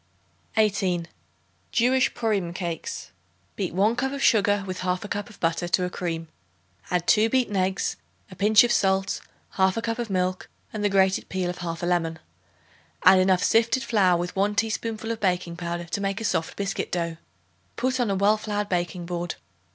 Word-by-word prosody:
18. 190 Hz, -5 st, +1 dB, 0.6 s
Jewish 255 Hz, +2 st, +3 dB
Purim 205 Hz, -7 st, -1 dB
Cakes. 170 Hz, -2 st, -5 dB, 0.4 s
Beat 190 Hz, -4 st, -2 dB
1 210 Hz, +5 st, +3 dB
cup 265 Hz, +2 st, -1 dB
of 280 Hz, 0 st, -3 dB
sugar 205 Hz, -2 st, +3 dB
with 185 Hz, -1 st, -5 dB
1/2 185 Hz, +2 st, -2 dB
cup 205 Hz, 0 st, -3 dB
of 215 Hz, -, -16 dB
butter 165 Hz, +1 st, 0 dB
to 180 Hz, +1 st, +2 dB
a 180 Hz, -, -4 dB
cream; 165 Hz, -2 st, -3 dB, 0.6 s
add 180 Hz, -1 st, 0 dB
2 220 Hz, +4 st, +4 dB
beaten 245 Hz, -4 st, +1 dB
eggs, 190 Hz, 0 st, 0 dB, 0.3 s
a -, -, -9 dB
pinch 210 Hz, +4 st, +6 dB
of 240 Hz, -, +1 dB
salt, 195 Hz, -2 st, +1 dB, 0.4 s
1/2 190 Hz, +3 st, +3 dB
cup 230 Hz, 0 st, -2 dB
of 235 Hz, -2 st, -3 dB
milk 185 Hz, -1 st, -1 dB, 0.2 s
and 215 Hz, -1 st, -3 dB
the 205 Hz, -, +3 dB
grated 190 Hz, -1 st, +2 dB
peel 185 Hz, -1 st, -1 dB
of 180 Hz, -, -10 dB
1/2 170 Hz, -1 st, -4 dB
lemon. 165 Hz, -2 st, 0 dB, 0.9 s
Add 185 Hz, 0 st, +8 dB
enough 185 Hz, -1 st, +3 dB
sifted 230 Hz, +3 st, +3 dB
flour 190 Hz, -6 st, +3 dB
with 175 Hz, +1 st, -4 dB
1 200 Hz, +2 st, +1 dB
teaspoonful 225 Hz, +1 st, -1 dB
of 225 Hz, -, -3 dB
baking 180 Hz, -4 st, 0 dB
powder 175 Hz, 0 st, -4 dB
to 170 Hz, +4 st, -3 dB
make 195 Hz, +1 st, -1 dB
a -, -, -5 dB
soft 160 Hz, -5 st, -1 dB
biscuit 200 Hz, -1 st, -3 dB
dough. 170 Hz, -2 st, -2 dB, 0.6 s
Put 255 Hz, +1 st, 0 dB
on 240 Hz, -4 st, +1 dB
a 195 Hz, -, +1 dB
well 205 Hz, +3 st, +3 dB
floured 210 Hz, -1 st, -3 dB
baking 175 Hz, -1 st, -2 dB
board. 175 Hz, 0 st, -3 dB
190 Hz, 180 wpm, -25 LUFS, 180-215 Hz, 0.9 s, Add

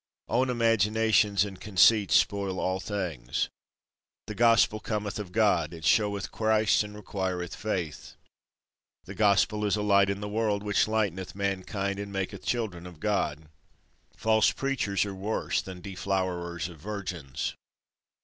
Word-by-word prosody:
Own 125 Hz, +3 st, +1 dB
imaginations 110 Hz, -3 st, +3 dB
and 95 Hz, -3 st, -9 dB
conceits 105 Hz, +1 st, +4 dB
spoil 100 Hz, -2 st, +1 dB
all 95 Hz, 0 st, -1 dB
things. 90 Hz, -, -3 dB, 0.8 s
The 105 Hz, -, -6 dB
Gospel 115 Hz, -1 st, +4 dB
cometh 105 Hz, -1 st, -3 dB
of 100 Hz, -4 st, -6 dB
God, 90 Hz, -6 st, +2 dB
it 80 Hz, -2 st, -8 dB
showeth 100 Hz, +1 st, +2 dB
Christ, 110 Hz, -1 st, +2 dB
and 105 Hz, 0 st, -9 dB
requireth 95 Hz, -4 st, -4 dB
Faith. 90 Hz, -8 st, -4 dB, 0.9 s
The 95 Hz, -, -9 dB
Gospel 105 Hz, +1 st, +2 dB
is 105 Hz, 0 st, +2 dB
a 105 Hz, -, -2 dB
light 100 Hz, -1 st, +4 dB
in 100 Hz, 0 st, -2 dB
the 105 Hz, -, -4 dB
world, 105 Hz, -1 st, 0 dB
which 105 Hz, 0 st, +2 dB
lighteneth 95 Hz, -5 st, -1 dB
mankind, 100 Hz, 0 st, -2 dB
and 100 Hz, 0 st, -5 dB
maketh 95 Hz, -1 st, -4 dB
children 100 Hz, -8 st, -2 dB
of 85 Hz, -4 st, -13 dB
God. 80 Hz, -6 st, -1 dB, 0.7 s
False 110 Hz, -1 st, +3 dB
Preachers 120 Hz, -8 st, -1 dB
are 100 Hz, -, -5 dB
worse 100 Hz, +3 st, -1 dB
than 90 Hz, -2 st, -9 dB
deflowerers 90 Hz, -4 st, -2 dB
of 85 Hz, -4 st, -12 dB
virgins. 90 Hz, -8 st, -4 dB
100 Hz, 140 wpm, -28 LUFS, 95-105 Hz, 0.9 s, conceits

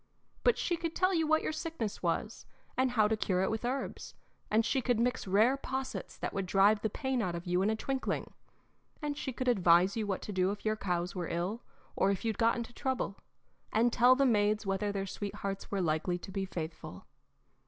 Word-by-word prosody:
But 485 Hz, -, +4 dB
she 345 Hz, -, 0 dB
could 330 Hz, -1 st, -4 dB
tell 370 Hz, +1 st, +3 dB
you 325 Hz, -3 st, +2 dB
what 315 Hz, 0 st, +3 dB
your -, -, -1 dB
sickness 315 Hz, -, -4 dB
was, -, -, -2 dB, 0.3 s
and 260 Hz, 0 st, +2 dB
how 220 Hz, -4 st, +3 dB
to 220 Hz, -, +1 dB
cure 185 Hz, -3 st, 0 dB
it -, -, 0 dB
with 220 Hz, +1 st, -3 dB
herbs, 255 Hz, +3 st, -3 dB, 0.3 s
and 220 Hz, +1 st, +3 dB
she 265 Hz, -, +1 dB
could 245 Hz, -2 st, +1 dB
mix 245 Hz, -2 st, 0 dB
rare 220 Hz, +8 st, +4 dB
possets 265 Hz, -1 st, -5 dB
that -, -, -4 dB
would 195 Hz, -1 st, -2 dB
drive 200 Hz, +3 st, +4 dB
the 220 Hz, -, 0 dB
pain 265 Hz, +2 st, -1 dB
out 180 Hz, -5 st, -1 dB
of 170 Hz, +1 st, -6 dB
you 180 Hz, +1 st, +1 dB
in 200 Hz, -, +2 dB
a 220 Hz, -, +1 dB
twinkling; 265 Hz, +4 st, -3 dB, 0.7 s
and 295 Hz, -2 st, -2 dB
she 275 Hz, -, -4 dB
could 255 Hz, +1 st, -4 dB
advise 185 Hz, -4 st, +5 dB
you 220 Hz, -2 st, -1 dB
what 195 Hz, -2 st, -2 dB
to -, -, -5 dB
do 185 Hz, -1 st, +2 dB
if 205 Hz, +1 st, -5 dB
your 215 Hz, 0 st, +2 dB
cows 180 Hz, -3 st, -2 dB
were 180 Hz, -3 st, -3 dB
ill, 180 Hz, +7 st, -2 dB, 0.3 s
or 195 Hz, -, +3 dB
if 200 Hz, +2 st, -1 dB
you'd 220 Hz, -2 st, -1 dB
got 230 Hz, 0 st, +4 dB
into 235 Hz, 0 st, -5 dB
trouble, 260 Hz, -5 st, -2 dB, 0.6 s
and 235 Hz, +2 st, +3 dB
tell 250 Hz, +1 st, +6 dB
the 275 Hz, +1 st, +3 dB
maids 210 Hz, -3 st, +2 dB
whether 195 Hz, +1 st, 0 dB
their 195 Hz, -1 st, -2 dB
sweethearts 195 Hz, 0 st, -5 dB
were 200 Hz, -2 st, -1 dB
likely 170 Hz, +2 st, 0 dB
to 185 Hz, -, -9 dB
be 195 Hz, 0 st, -2 dB
faithful. 160 Hz, -, -7 dB
215 Hz, 215 wpm, -32 LUFS, 195-255 Hz, 0.7 s, tell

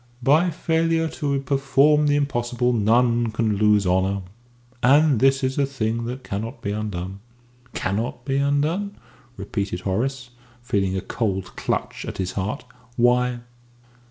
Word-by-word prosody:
"By 155 Hz, +7 st, +4 dB
failure 165 Hz, 0 st, +1 dB
to 140 Hz, -2 st, -2 dB
perform 140 Hz, +2 st, +3 dB
the 145 Hz, -, +3 dB
impossible 125 Hz, -3 st, 0 dB
none 115 Hz, +1 st, +3 dB
can 110 Hz, -1 st, 0 dB
lose 105 Hz, -1 st, +3 dB
honour. 95 Hz, +2 st, +1 dB, 0.6 s
And 145 Hz, 0 st, +5 dB
this 135 Hz, +2 st, +3 dB
is 130 Hz, +1 st, 0 dB
a 140 Hz, -, +3 dB
thing 115 Hz, -3 st, -2 dB
that 125 Hz, +2 st, -5 dB
cannot 110 Hz, +6 st, -5 dB
be 100 Hz, -, -1 dB
undone." 100 Hz, -3 st, -4 dB, 0.6 s
"Cannot 115 Hz, +5 st, -2 dB
be 135 Hz, 0 st, 0 dB
undone?" 150 Hz, +9 st, 0 dB, 0.4 s
repeated 100 Hz, -4 st, -3 dB
Horace, 125 Hz, +7 st, -2 dB, 0.3 s
feeling 95 Hz, -5 st, 0 dB
a -, -, -2 dB
cold 95 Hz, -4 st, -3 dB
clutch -, -, -3 dB
at -, -, -6 dB
his 95 Hz, -1 st, -2 dB
heart. 100 Hz, +8 st, -3 dB, 0.3 s
"Why?" 125 Hz, 0 st, +2 dB
120 Hz, 135 wpm, -23 LUFS, 105-140 Hz, 0.6 s, And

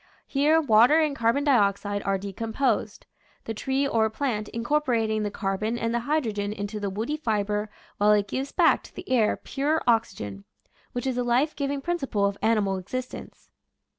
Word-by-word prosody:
Here 295 Hz, +3 st, +3 dB
water 250 Hz, +2 st, +5 dB
and 305 Hz, -3 st, +1 dB
car 230 Hz, -3 st, +3 dB
bon 280 Hz, +4 st, -1 dB
dioxide 205 Hz, -6 st, +2 dB
are 195 Hz, 0 st, 0 dB
decomposed, 220 Hz, +3 st, -2 dB, 0.4 s
the 225 Hz, -, -4 dB
tree 265 Hz, +5 st, 0 dB
or 220 Hz, -4 st, +2 dB
plant 220 Hz, -3 st, -2 dB
incorporating 230 Hz, -4 st, 0 dB
the 210 Hz, -, -1 dB
carbon 205 Hz, +3 st, -2 dB
and 230 Hz, 0 st, -1 dB
the 235 Hz, -, +1 dB
hydrogen 215 Hz, -10 st, 0 dB
into 205 Hz, +1 st, -5 dB
the 200 Hz, -1 st, -2 dB
woody 225 Hz, +10 st, -3 dB
fiber 210 Hz, -5 st, -1 dB, 0.3 s
while 205 Hz, +1 st, +4 dB
it 205 Hz, -1 st, +2 dB
gives 265 Hz, +7 st, -3 dB
back -, -, +4 dB
to -, -, -16 dB
the -, -, -9 dB
air 235 Hz, -5 st, +2 dB
pure 295 Hz, +4 st, -1 dB
oxygen, 185 Hz, -, 0 dB, 0.5 s
which 245 Hz, +1 st, -3 dB
is 260 Hz, -2 st, -1 dB
the 250 Hz, -, +1 dB
life 250 Hz, +6 st, +1 dB
giving 280 Hz, -1 st, -2 dB
principle 275 Hz, -11 st, -1 dB
of 200 Hz, 0 st, 0 dB
animal 210 Hz, -4 st, +2 dB
existence. 255 Hz, +7 st, -7 dB
225 Hz, 170 wpm, -26 LUFS, 205-270 Hz, 0.5 s, water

